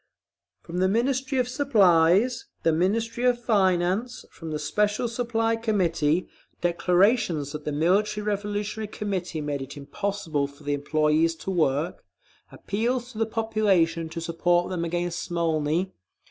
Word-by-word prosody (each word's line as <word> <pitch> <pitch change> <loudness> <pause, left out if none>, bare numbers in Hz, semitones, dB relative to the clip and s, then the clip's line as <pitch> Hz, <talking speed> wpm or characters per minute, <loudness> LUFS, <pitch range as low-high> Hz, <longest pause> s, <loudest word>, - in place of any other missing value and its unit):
From 175 +2 -5
the 185 - +3
Ministry 260 +6 0
of 250 -1 +2
Supplies, 210 - +3 0.2
the 165 - +3
Ministry 225 +8 0
of 250 -1 +3
Finance, 200 +1 +1
from 165 - -9
the 155 - -2
Special 210 +9 0
Supply 230 -1 0
Committee, 180 -7 +1 0.3
declarations 175 - +2
that 150 0 -7
the 150 - -1
Military 200 +8 +1
Revolutionary 210 +1 -2
Committee 185 -6 -3
made 145 -2 -3
it 135 +2 -8
impossible 160 -1 -2
for 140 +1 -17
the 145 0 -1
employees 155 +3 +1
to 190 - -5
work, 155 -1 0 0.5
appeals 240 +4 -2
to 215 - -9
the 225 - +1
population 200 -8 +1
to 165 +1 -5
support 175 +2 +1
them 175 -2 -2
against 175 +1 -2
Smolny…. 165 +1 0
185 Hz, 135 wpm, -25 LUFS, 165-220 Hz, 0.5 s, the